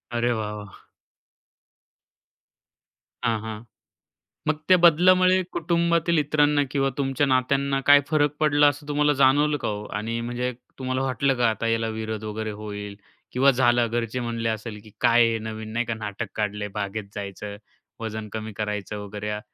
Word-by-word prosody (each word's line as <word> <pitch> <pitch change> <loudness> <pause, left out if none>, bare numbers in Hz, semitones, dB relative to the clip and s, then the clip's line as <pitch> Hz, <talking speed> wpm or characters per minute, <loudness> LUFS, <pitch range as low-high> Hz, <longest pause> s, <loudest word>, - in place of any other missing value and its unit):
अरे 120 +1 +1
वाह! 110 -2 -3
वाह! 100 - -17 2.4
हां, 115 -2 +1
हां. 110 0 -7 0.8
मग 155 0 +1
त्या 185 - +8
बदलामुळे 185 +2 +5
कुटुंबातील 170 0 +1
इतरांना 150 0 +3
किंवा 135 -1 +1
तुमच्या 135 +1 +1
नात्यांना 135 +1 +1
काय 145 0 +8
फरक 150 -2 +2
पडला 145 -1 +4
असं 145 +1 -4
तुम्हाला 150 0 +2
जाणवलं 145 +2 +3
का - - -2
हो? 105 0 -4
आणि 115 +3 -3
म्हणजे 120 +1 -2 0.3
तुम्हाला 130 0 -2
वाटलं 135 +1 +1
का 120 -1 +3
आता 110 +1 -3
याला 115 0 0
विरोध 110 -1 -4
वगैरे 110 +1 -4
होईल 105 -1 -6 0.4
किंवा 135 +2 +5
झालं 120 -2 +3
घरचे 115 +1 -2
म्हणले 115 -1 -2
असेल, 110 -1 -4
की 110 - -15
काय 120 0 +5
हे 115 - -1
नवीन 110 0 -6
नाही 120 +2 0
का 115 - -2
नाटक 105 -3 -5
काढलंय 105 -1 -2
बागेत 105 +1 -3
जायचं, 100 0 -6 0.4
वजन 110 -1 -5
कमी 110 0 -5
करायचं 105 -1 -3
वगैरे 105 +1 -4
120 Hz, 155 wpm, -24 LUFS, 110-145 Hz, 2.4 s, त्या